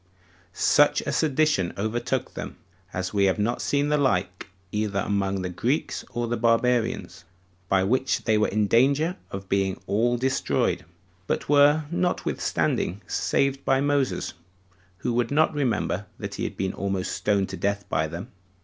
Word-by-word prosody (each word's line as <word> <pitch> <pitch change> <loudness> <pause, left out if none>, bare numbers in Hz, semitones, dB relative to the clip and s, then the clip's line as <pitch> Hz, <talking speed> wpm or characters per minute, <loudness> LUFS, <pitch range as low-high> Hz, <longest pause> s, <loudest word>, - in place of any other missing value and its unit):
Such - - +4
a - - -3
sedition 150 - +1
overtook 110 +4 -2
them, - - -7 0.3
as 90 +1 -3
we 100 -1 +3
have 95 - +2
not 110 +4 0
the 140 0 +2 0.2
like 100 -10 +2
example 90 0 -13 0.2
either 105 -1 -1
among 100 -1 -1
the 90 - -2
Greeks 125 - -1
or 120 0 -2
the 120 +1 -1
Barbarians, 115 0 +1 0.5
by 95 -1 +3
which 130 +6 +1
they 110 - +2
were 105 0 +3
in 105 +1 +1
danger 140 - +3
of 95 0 -7
being 95 -1 0
all 120 +5 +1
destroyed, 130 -9 0 0.4
but - - -1
were 145 +2 +5
notwithstanding 175 - -1
saved 140 0 0
by 135 - +2
Moses, 145 -1 0 0.6
who 120 +7 -2
would 120 -1 +1
not 155 +2 +3
remember 115 -8 -1
that - - -6
he - - -3
had - - -5
been 95 -1 -1
almost 95 -1 -2
stoned 100 -2 0
to - - -5
death 100 0 -1
by 80 - 0
them. 85 +10 -7
115 Hz, 160 wpm, -25 LUFS, 100-135 Hz, 0.6 s, were